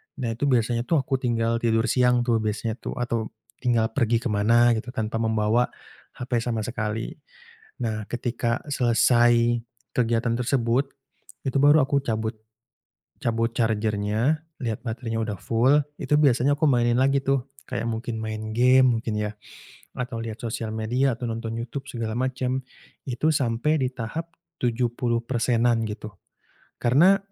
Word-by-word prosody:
Nah, 125 -4 -2
itu 120 +6 -1
biasanya 120 -2 +1
tuh 165 - +2
aku 135 0 -1
tinggal 115 -2 0
tidur 115 -1 +2
siang 125 -1 +3
tuh, 120 -2 +2
biasanya 110 +2 -2
tuh - - -5
atau 115 -2 -2 0.3
tinggal 120 -3 +1
pergi 115 -1 +1
kemana 115 +2 +4
gitu, 120 +3 -9
tanpa 110 0 -2
membawa 110 +1 +2 0.5
HP 125 -1 -1
sama 115 -2 -2
sekali. 110 -1 -3 0.7
Nah, 110 -3 -3
ketika 120 -1 -1
selesai 120 -2 +3 0.3
kegiatan 115 -1 +1
tersebut, 125 +2 +1 0.6
itu 135 0 0
baru 145 +2 +7
aku 140 0 +1
cabut, 110 -2 -2 0.9
cabut 115 -1 +1
charger-nya, 110 +5 0 0.2
lihat 115 -3 -3
baterainya 115 -1 -3
udah 105 -3 -3
full, 120 +8 +3 0.2
itu 140 +2 +1
biasanya 140 0 +3
aku 155 - +3
mainin 120 -1 +2
lagi 135 +1 +3
tuh 135 -1 0 0.2
kayak 120 -3 -2
mungkin 115 0 -4
main 110 0 -4
gim 125 -1 +5
mungkin 115 -1 -3
ya, 105 0 -1 0.6
atau 125 -2 -4
lihat 110 -1 -6
sosial 110 -1 -4
media 120 +5 +1
atau 120 -1 -4
nonton 115 0 -4
Youtube 125 +4 -5
segala 115 -2 -3
macem, 130 0 -1 0.4
itu 130 +4 0
sampai 135 +3 +1
di 130 - +1
tahap 160 +8 -5 0.3
70%-an 120 -1 +1
gitu. 105 0 -6 0.7
Karena 165 +11 +5
120 Hz, 140 wpm, -25 LUFS, 115-125 Hz, 0.9 s, baru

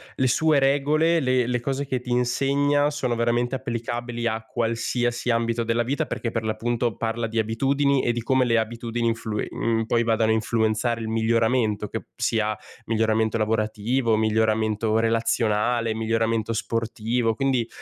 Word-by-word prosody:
le 130 - +1
sue 155 +2 +3
regole, 150 +5 +2
le 130 -3 +1
le 125 0 -1
cose 135 +3 -2
che 130 -2 -2
ti 125 - -10
insegna 140 +4 +2
sono 130 -5 -2
veramente 120 +2 0
applicabili 120 -1 -3
a 110 0 -2
qualsiasi 120 +1 -1
ambito 115 0 0
della 115 +1 +1
vita, 135 +4 -1
perché 115 - -4
per 115 -1 -2
l'appunto 115 +1 -1
parla 115 0 -2
di 115 +1 -6
abitudini 135 +5 +1
e 120 - 0
di 120 -1 -4
come 130 0 +2
le 115 -1 +2
abitudini 115 +1 -2
influi 115 -2 -2
mhmm, 115 -1 -1
poi 120 -1 +2
vadano 110 -1 +2
a - - +4
influenzare 110 +1 0
il 110 - -4
miglioramento, 110 -1 +1
che - - -5
sia 110 -1 0 0.3
miglioramento 110 0 +1
lavorativo, 110 +2 0
miglioramento 110 0 +1
relazionale, 115 0 +1
miglioramento 115 0 0
sportivo. 115 +1 -1
Quindi 130 -3 0
115 Hz, 150 wpm, -24 LUFS, 110-125 Hz, 0.3 s, a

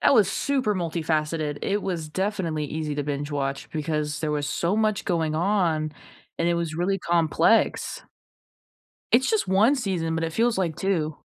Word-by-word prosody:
that - - +5
was 210 -6 +5
super 260 -7 0
multifaceted. 155 -3 -1
It 205 +1 -1
was 170 -5 -3
definitely 180 -3 -1
easy 155 0 -3
to 145 - -1
binge-watch 140 -1 -3
because 150 -1 -2
there 155 - -1
was 145 -1 -1
so 175 +4 0
much 215 -2 +1
going 165 -4 0
on, 165 -3 +1 0.5
and 170 - +2
it 175 - +2
was 170 -2 -2
really 190 +3 0
complex. 170 - +2 1.1
It's 255 +3 +4
just 440 - +1
1, 190 - +2
but 165 - -1
it 165 - -5
feels 230 +3 +2
like 170 -5 0
2. 160 -6 -1
170 Hz, 160 wpm, -25 LUFS, 155-195 Hz, 1.1 s, that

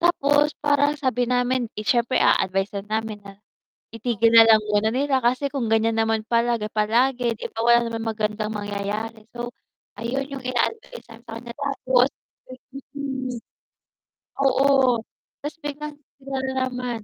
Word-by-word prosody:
tapos 295 -3 +3
parang 290 0 +3
sabi 250 -3 +1
namin, 250 -1 +1
'di - - -6
siyempre 240 +2 +2
aadvice-an 195 +2 +1
namin 220 -1 -2
na 195 -1 -11 0.6
itigil 230 0 +1
nalang 225 -1 +8
muna 210 +1 +3
nila 270 +1 +1
kasi 255 +4 +2
kung 250 -5 -2
ganyan 225 0 +2
naman 225 0 +1
palagi-palagi 235 +2 +1
'di - - -5
ba, - - -2
wala 235 0 +4
naman 225 0 -4
magandang 215 -1 -2
mangyayari. 210 +2 -4
So 240 0 -5 0.5
ayun 265 +4 -2
yung 270 -2 -6
ina-advice 345 - -2
sa 225 - -12
kaniya 235 0 -8
tapos 265 -3 +2 0.9
mm. 265 -3 -4 1.1
Oo, 270 -3 +3 0.4
'tas 295 - -5
biglang 295 0 -6 0.2
sila 270 0 -4
nanaman. 250 -3 -3
240 Hz, 130 wpm, -23 LUFS, 225-265 Hz, 1.1 s, nalang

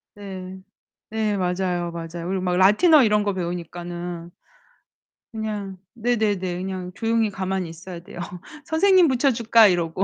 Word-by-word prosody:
네. 190 -2 -8 0.5
네, 215 -2 -1
맞아요. 180 -1 -1
맞아요. 170 0 -6
그리고 190 0 -1
막 180 -1 0
라틴어 255 - +6
이런 210 -1 +3
거 200 - 0
배우니까는. 175 -1 -5 1.0
그냥 210 -3 -4 0.2
네네네. 210 -6 0
그냥 185 -1 -5
조용히 225 -1 +1
가만히 190 -2 -3
있어야 170 +1 -9
돼요. 175 - -11 0.5
선생님 370 +2 +4
붙여줄까? 235 -4 +4
이러고. 175 0 0
190 Hz, 305 characters per minute, -23 LUFS, 175-220 Hz, 1.0 s, 라틴어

